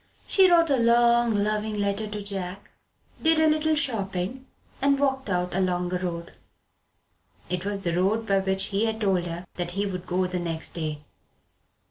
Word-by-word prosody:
She 380 Hz, -2 st, +5 dB
wrote 335 Hz, -3 st, +4 dB
a 275 Hz, -, +4 dB
long 235 Hz, 0 st, +4 dB
loving 210 Hz, +1 st, -1 dB
letter 200 Hz, +1 st, -1 dB
to 210 Hz, 0 st, -5 dB
John, 190 Hz, -2 st, -3 dB, 0.6 s
did 320 Hz, 0 st, +3 dB
a 315 Hz, -, +4 dB
little 310 Hz, 0 st, +2 dB
shopping, 220 Hz, -2 st, -2 dB, 0.3 s
and 280 Hz, 0 st, +3 dB
walked 265 Hz, -4 st, 0 dB
out 180 Hz, -1 st, -1 dB
along 180 Hz, -1 st, 0 dB
a 180 Hz, -, 0 dB
road. 170 Hz, -2 st, -5 dB, 1.2 s
It 180 Hz, 0 st, -2 dB
was 200 Hz, -1 st, -2 dB
the 170 Hz, -, 0 dB
road 205 Hz, +5 st, +1 dB
by 195 Hz, -2 st, +2 dB
which 190 Hz, 0 st, 0 dB
he 200 Hz, +2 st, +1 dB
had 220 Hz, 0 st, -2 dB
told 190 Hz, -4 st, +1 dB
her 170 Hz, +2 st, -6 dB
that 175 Hz, -1 st, -2 dB
he 200 Hz, -, +1 dB
would 185 Hz, -2 st, -5 dB
go 185 Hz, +1 st, 0 dB
the 180 Hz, 0 st, -3 dB
next 165 Hz, -2 st, -3 dB
day. 155 Hz, -3 st, -4 dB
200 Hz, 175 wpm, -26 LUFS, 180-235 Hz, 1.2 s, She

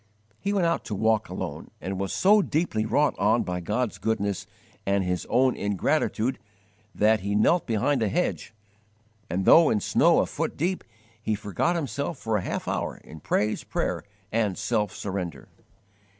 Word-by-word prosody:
He 200 Hz, -, -1 dB
went 195 Hz, -4 st, +2 dB
out 170 Hz, 0 st, +1 dB
to 105 Hz, -, -3 dB
walk 110 Hz, +1 st, +1 dB
alone, -, -, -5 dB
and 95 Hz, 0 st, -4 dB
was 95 Hz, -1 st, -2 dB
so 205 Hz, +2 st, +5 dB
deeply 145 Hz, -, 0 dB
wrought 145 Hz, +5 st, +2 dB
on 110 Hz, +4 st, +3 dB
by 90 Hz, 0 st, -3 dB
God's 105 Hz, +7 st, -2 dB
goodness 100 Hz, -3 st, -1 dB, 0.4 s
and 100 Hz, 0 st, +1 dB
his 90 Hz, -1 st, -2 dB
own 130 Hz, 0 st, +3 dB
ingratitude 115 Hz, -, 0 dB, 0.6 s
that 110 Hz, +1 st, +4 dB
he 100 Hz, +1 st, -2 dB
knelt 165 Hz, +12 st, +3 dB
behind 120 Hz, +4 st, +1 dB
a 110 Hz, -, +2 dB
hedge, -, -, -1 dB, 0.8 s
and, 95 Hz, +3 st, -1 dB
though 165 Hz, -2 st, +7 dB
in 110 Hz, -, +2 dB
snow -, -, +3 dB
a -, -, +3 dB
foot -, -, -3 dB
deep, 180 Hz, +4 st, -1 dB, 0.4 s
he 110 Hz, -1 st, 0 dB
forgot 105 Hz, -, -1 dB
himself 145 Hz, 0 st, -3 dB
for 110 Hz, -3 st, -1 dB
a -, -, -2 dB
half -, -, -4 dB
hour -, -, -2 dB
in 80 Hz, -, -11 dB
praise, 105 Hz, +7 st, 0 dB
prayer, -, -, -2 dB, 0.3 s
and 105 Hz, -4 st, 0 dB
self 105 Hz, 0 st, 0 dB
surrender. 90 Hz, -7 st, -5 dB
110 Hz, 165 wpm, -26 LUFS, 100-140 Hz, 0.8 s, though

